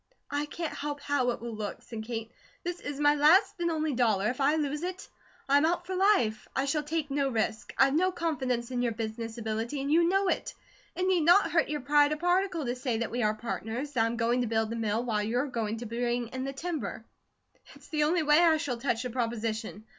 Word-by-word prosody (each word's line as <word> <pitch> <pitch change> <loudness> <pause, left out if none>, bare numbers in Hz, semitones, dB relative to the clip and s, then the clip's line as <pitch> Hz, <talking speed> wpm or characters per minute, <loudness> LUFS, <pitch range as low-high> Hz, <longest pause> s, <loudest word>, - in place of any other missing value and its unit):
"I 290 +1 -1
can't 330 +1 -4
help 290 0 -4
how 285 -3 0
it 240 - -3
will 235 -1 -5
look," 210 -2 -5
said 225 -2 -7
Kate. 225 0 -5 0.3
"This 350 0 -4
is 290 -1 -6
my 290 0 +5
last 310 +8 +5
and 340 0 +1
only 310 -2 -1
dollar; 220 -5 +2
if 255 - -6
I 285 +3 +4
lose 300 -1 -1
it, 365 +1 -5 0.4
I 280 +1 +5
am 290 - +4
out 350 +1 -1
for 375 - -4
life; 365 - +2
I 265 - +1
shall 300 +2 0
take 300 -1 -3
no 275 -1 +1
risk. 220 -1 -2
I've 270 0 +5
no 365 +5 +3
confidence 260 -8 -2
in 245 -1 -1
your 240 -2 0
business 225 +1 -5
ability, 225 +4 -3
and 280 +2 -2
you 335 +2 +5
know 390 +1 +2
it. - - -1 0.4
It 365 - -1
need 370 -2 +3
not 350 +6 +5
hurt 330 -4 +2
your 300 -1 -2
pride 290 +2 +4
a - - -3
particle 355 -1 +1
to 245 +1 -1
say 250 -2 -2
that 230 0 -2
we 245 - -1
are 215 -1 +2
partners; 235 +4 -4
that 230 -4 +2
I'm 230 +1 -1
going 240 +1 +1
to 245 - -1
build 220 0 0
the - - -2
mill, 225 0 -1
while 215 -3 0
you're 240 +6 0
going 225 -5 -3
to 240 - -6
bring 240 +1 -2
in 260 +1 -4
the 275 - -3
timber. 320 +2 -4 0.7
It's - - -17
the 300 -2 +1
only 330 +2 +2
way 300 +1 +5
I 330 -2 +5
shall 290 -6 -3
touch 240 -1 -1
the 250 - -4
proposition. 225 -3 -3
270 Hz, 235 wpm, -29 LUFS, 230-310 Hz, 0.7 s, my